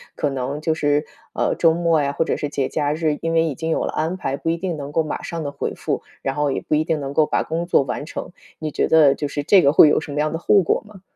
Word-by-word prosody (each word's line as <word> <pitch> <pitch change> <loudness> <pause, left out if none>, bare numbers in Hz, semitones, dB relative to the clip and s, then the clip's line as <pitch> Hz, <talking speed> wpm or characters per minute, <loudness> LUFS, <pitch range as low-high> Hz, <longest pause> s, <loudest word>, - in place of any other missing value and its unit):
可 145 - -1
能 135 +3 -3
就 160 0 +1
是， 145 -1 +1 0.3
呃， - - +1
周 165 -1 +4
末 165 -2 +2
呀， 140 0 -1
或 165 - 0
者 - - 0
是 145 - -3
节 140 -2 -2
假 145 -1 -1
日， 155 -2 0
因 165 0 -1
为 165 0 +4
已 160 - -1
经 160 +4 -4
有 160 - 0
了 - - -3
安 165 +4 -1
排， 140 -6 -3
不 165 - -3
一 165 - 0
定 175 -2 -3
能 140 -1 -6
够 160 +2 +1
马 155 - -4
上 165 -2 -5
地 145 - -4
回 - - -4
复， - - -3 0.2
然 135 - -1
后 145 0 0
也 - - -2
不 - - -4
一 155 - +2
定 160 -2 0
能 140 0 -5
够 155 +1 +4
把 - - 0
工 165 +2 -3
作 155 - +3
完 135 +3 -4
成。 170 - -7 0.3
你 155 -1 -4
觉 - - 0
得， 155 -4 +6
就 145 - -3
是 145 +1 -4
这 190 +3 +5
个 140 +1 +3
会 155 - +8
有 - - +3
什 155 -2 -8
么 145 - -2
样 155 0 0
的 160 - -3
后 195 +3 +4
果 - - +1
吗？ 200 -3 -15
155 Hz, 330 characters per minute, -21 LUFS, 145-165 Hz, 0.3 s, 会